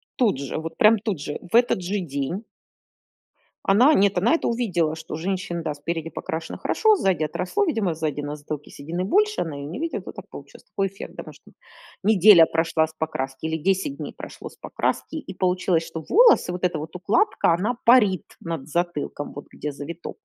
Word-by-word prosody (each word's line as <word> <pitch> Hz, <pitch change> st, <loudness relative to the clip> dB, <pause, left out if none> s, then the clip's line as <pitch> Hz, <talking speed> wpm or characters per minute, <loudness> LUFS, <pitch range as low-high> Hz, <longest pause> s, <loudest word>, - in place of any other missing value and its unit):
тут 225 Hz, -, +2 dB
же, 140 Hz, -2 st, -4 dB
вот 160 Hz, +1 st, -6 dB
прям 215 Hz, +1 st, +6 dB
тут 205 Hz, -5 st, -3 dB
же, 145 Hz, +1 st, -5 dB
в -, -, +1 dB
этот 240 Hz, -5 st, +4 dB
же 195 Hz, +4 st, -2 dB
день 155 Hz, +4 st, -3 dB, 1.2 s
Она 245 Hz, +10 st, +6 dB
нет, 195 Hz, -1 st, +3 dB
она 225 Hz, -, +3 dB
это 330 Hz, -, 0 dB
увидела, 185 Hz, -10 st, 0 dB
что 160 Hz, 0 st, -8 dB
у -, -, -2 dB
женщины, 175 Hz, 0 st, -3 dB
да, 155 Hz, -2 st, -2 dB
спереди 165 Hz, +2 st, -4 dB
покрашено 165 Hz, 0 st, -5 dB
хорошо, 435 Hz, -1 st, +3 dB
сзади 190 Hz, -, +1 dB
отросло. 180 Hz, -, -1 dB
Видимо 225 Hz, -, 0 dB
сзади 155 Hz, -2 st, -2 dB
на 145 Hz, +1 st, -4 dB
затылке 150 Hz, 0 st, -7 dB
седины 170 Hz, +5 st, -4 dB
больше, 420 Hz, -, +2 dB
она 160 Hz, -4 st, -3 dB
ее 140 Hz, -, -6 dB
не 160 Hz, +8 st, -6 dB
видит, 330 Hz, 0 st, -3 dB
вот -, -, -9 dB
так -, -, -10 dB
получилось. -, -, -12 dB
Такой 195 Hz, 0 st, -2 dB
эффект, 195 Hz, +1 st, -10 dB
домашний. -, -, -12 dB, 0.5 s
Неделя 200 Hz, -3 st, +7 dB
прошла 160 Hz, 0 st, +1 dB
с 160 Hz, -, -15 dB
покраски, 145 Hz, -3 st, -4 dB
или 160 Hz, 0 st, -1 dB
10 195 Hz, -, 0 dB
дней -, -, -6 dB
прошло -, -, -9 dB
с -, -, -19 dB
покраски, -, -, -2 dB
и 245 Hz, -11 st, -7 dB
получилось, 180 Hz, -2 st, +1 dB
что 160 Hz, -1 st, -7 dB
волосы, 450 Hz, -, +5 dB
вот 180 Hz, -, -6 dB
эта 175 Hz, -3 st, +1 dB
вот 155 Hz, +2 st, -7 dB
укладка- 205 Hz, -, +2 dB
она 205 Hz, +8 st, 0 dB
парит 210 Hz, -7 st, +5 dB, 0.2 s
над 165 Hz, -4 st, -5 dB
затылком, 170 Hz, -3 st, -2 dB
вот 145 Hz, -, -9 dB
где 150 Hz, -, -5 dB
завиток. 150 Hz, +4 st, -7 dB
175 Hz, 190 wpm, -24 LUFS, 160-205 Hz, 1.2 s, Неделя